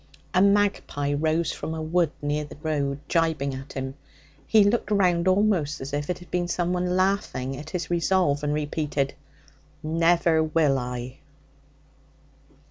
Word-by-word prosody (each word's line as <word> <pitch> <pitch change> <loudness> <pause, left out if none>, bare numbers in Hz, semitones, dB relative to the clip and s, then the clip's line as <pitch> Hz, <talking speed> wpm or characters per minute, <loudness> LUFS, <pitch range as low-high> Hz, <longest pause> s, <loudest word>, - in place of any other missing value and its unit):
A 185 - +4
magpie 200 -8 +2
rose 160 +3 +1
from 160 - -5
a 160 - -4
wood 165 0 +2
near 145 +1 0
the 150 - -10
road, 145 -3 -1
jibing 160 -5 +1
at 135 +2 -8
him. 135 0 -4 0.5
He 220 -2 +6
looked 215 +3 +1
round 180 -4 +2
almost 185 -6 +2
as 135 +2 -7
if 145 +2 -2
it 180 - -1
had 175 - -15
been 175 -1 0
someone 180 +1 0
laughing 185 -9 0
at 150 +4 -8
his 175 -2 -4
resolve, 170 -4 +2
and 145 - 0
repeated, 150 -2 -1 0.7
'Never 165 +1 +3
will 155 -3 +2
I!' 125 +1 -6
160 Hz, 145 wpm, -25 LUFS, 145-180 Hz, 0.7 s, He